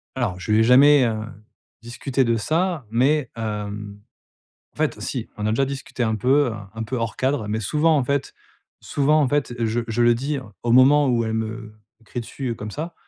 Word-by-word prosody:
Alors, 90 - -2
je 90 - -4
lui 105 - +4
ai - - +5
jamais, 135 +3 +6
heu, 115 -2 0 0.7
discuté 125 +3 -2
de 115 0 +2
ça, 160 - -1
mais, 130 +4 +1
hem, 105 -2 -5 0.7
en - - -28
fait, - - 0
heu, - - -11
si. - - -4
On 105 - -3
a - - +1
déjà 115 +5 +1
discuté 135 -2 -4
un 110 -1 0
peu, 135 +6 +3
heu, - - -4 0.2
un 110 0 -5
peu 125 +4 -4
hors 115 -1 -3
cadre, 130 -4 -1
mais 110 +1 -2
souvent 155 +9 +2
en 140 - +1
fait 140 +1 -2 0.5
souvent 150 +2 +2
en 135 - +1
fait, 145 -3 0
je 115 +1 0
je 115 +1 -1
le 120 0 +5
dis 140 +4 -2 0.2
au 120 -1 +1
moment 140 +3 +6
où 120 -2 +1
elle 110 - -2
me 110 0 -4 0.3
crie 120 - -6
dessus, 125 +2 -5
heu, 115 - -2
comme 105 0 -7
ça, 160 +8 -5
120 Hz, 215 wpm, -22 LUFS, 110-140 Hz, 0.7 s, jamais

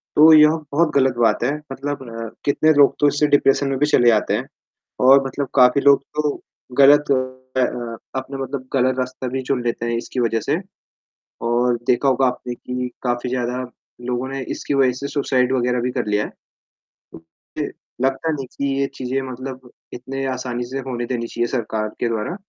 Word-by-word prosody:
तो 155 +2 +8
यह 150 -1 +8 0.2
बहुत 155 +2 +2
ग़लत 130 -2 +3
बात 115 0 +2
है, 130 +4 +1 0.2
मतलब 130 -5 -6
कितने 155 +2 +3
लोग 145 -1 +5
तो 145 - +4
इससे 145 +1 +2
डिप्रेशन 140 -1 +3
में 135 - -1
भी 150 - +4
चले 120 -5 +3
जाते 110 -3 +3
हैं - - -3 0.6
और 135 +1 +7
मतलब 135 +1 -3
काफ़ी 125 +2 +5
लोग 140 0 +5
तो 150 -1 -3 0.4
ग़लत 145 +1 +6 0.5
अ, - - +4 0.5
अपना 130 +1 -4
मतलब 135 0 -5
ग़लत 130 0 +2
रास्ता 130 0 -3
भी 130 +2 -3
चुन 130 -1 -1
लेते 120 0 -2
हैं 120 - -1
इसकी 120 +2 -5
वजह 115 -2 +1
से 145 +8 0 0.9
और 120 +1 +2
देखा 130 +2 +2
होगा 130 0 +3
आपने 125 -1 -3
कि 125 +1 -5
काफ़ी 120 0 -1
ज़्यादा 125 0 -2 0.5
लोगों 125 +1 -2
ने 135 0 -4
इसकी - - -4
वजह 135 -2 +3
से 140 - -4
सुसाइड 130 -3 +1
वग़ैरह 125 -1 +1
भी 125 +1 -1
कर 125 -3 -2
लिया 105 0 +1
है। - - -7 0.6
तो - - -17
मुझे 80 0 -8 0.3
लगता 135 +5 0
नहीं 140 -4 -4
कि 140 - -1
ये 140 - +1
चीज़ें 130 +1 -2
मतलब 130 0 -8 0.2
इतनें 135 +2 -5
आसानी 125 -2 -3
से 135 - -3
होने 120 -2 -3
देनी 115 -1 -3
चाहिए 120 0 -2
सरकार 110 -3 -2
के - - 0
द्वारा 115 +9 -2
130 Hz, 185 wpm, -21 LUFS, 120-140 Hz, 0.9 s, तो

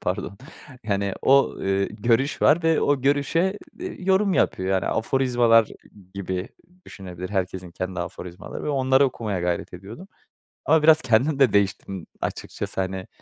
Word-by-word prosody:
pardon, 100 - -3 0.5
yani, 100 -2 -1
o, 135 +1 +4
eee, 95 0 0
görüş 120 +6 0
var 160 +3 +4
ve 165 0 +2
o 145 -2 +1
görüşe, 155 +8 +1 0.2
eee, 365 - -7
yorum 190 0 +2
yapıyor. 95 - 0
Yani, 95 -2 0
aforizmalar 120 -2 +2 0.5
gibi 95 -1 -4 0.4
düşünebilir, 90 -2 -8
herkesin 95 -2 -3
kendi 90 +1 -5
aforizmaları 90 0 -8
var, - - -3
onları 135 -1 +3
okumaya 110 -7 -3
gayret 90 0 -2
ediyordum 105 - -11 0.6
ama 160 0 +3
biraz 155 0 +6
kendim 130 +4 +2
de 130 -7 +4
değiştim, 95 -2 -1 0.2
açıkçası. 95 - -4
Hani, 95 0 -4
110 Hz, 140 wpm, -23 LUFS, 95-140 Hz, 0.6 s, biraz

